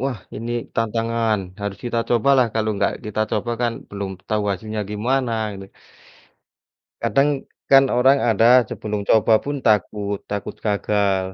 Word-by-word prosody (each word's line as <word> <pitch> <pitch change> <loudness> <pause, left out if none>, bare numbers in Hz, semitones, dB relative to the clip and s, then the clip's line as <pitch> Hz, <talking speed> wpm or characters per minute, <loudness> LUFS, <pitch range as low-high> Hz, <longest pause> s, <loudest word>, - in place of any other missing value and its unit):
wah 130 -4 -2 0.2
ini 115 +2 -5 0.2
tantangan. 115 -1 0 0.2
Harus 100 -1 -4
kita 120 -1 -1
cobalah 130 +2 +4
kalau 110 -1 0
enggak 100 - +1
kita 105 0 -3
coba 110 +2 -1
kan 120 -1 +1 0.2
belum 100 -1 -4 0.2
tahu 105 -1 +1
hasilnya 110 +3 -4
gimana 125 +4 0 0.2
ini. 95 0 -9 1.4
Kadang, 140 0 +1 0.2
kan 135 -1 +5
orang 135 +3 +4
ada 115 +3 +5
sebelum 105 -1 -4
coba 110 0 +4
pun 145 0 -3
takut 105 -1 +1
takut 100 -1 -4
gagal. 100 -2 0
110 Hz, 140 wpm, -21 LUFS, 105-120 Hz, 1.4 s, kan